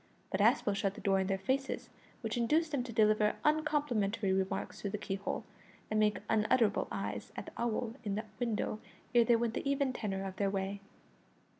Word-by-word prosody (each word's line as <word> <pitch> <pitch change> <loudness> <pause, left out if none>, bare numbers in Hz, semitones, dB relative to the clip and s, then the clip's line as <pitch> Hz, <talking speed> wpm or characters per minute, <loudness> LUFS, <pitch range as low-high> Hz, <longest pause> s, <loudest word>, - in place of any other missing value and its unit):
But 190 - +1
Aspel 220 -2 +4
shut 195 -1 0
the - - -9
door 195 -1 +3
in 190 - 0
their 195 0 +1
faces, 265 +8 -2 0.3
which 225 -2 -2
induced 305 +7 +2
them 280 -4 +1
to 240 - -6
deliver 215 -1 +4
uncomplimentary 270 -10 +2
remarks 190 0 -2
through 200 - -2
the 210 - -2
keyhole, 195 -1 -3 0.5
and 215 - +2
make 210 -1 +3
unutterable 220 0 +3
eyes - - -4
at - - -5
the - - -9
owl 235 0 -1
in 205 -3 -1
the 215 +2 -3
window 225 -3 -1 0.3
ere 240 -1 +6
they 240 - +5
went 230 -1 0
the 275 - -2
even 280 -2 +1
tenor 195 -4 -3
of 190 0 -6
their 200 -1 +2
way. 195 0 -2
215 Hz, 190 wpm, -33 LUFS, 200-245 Hz, 0.5 s, ere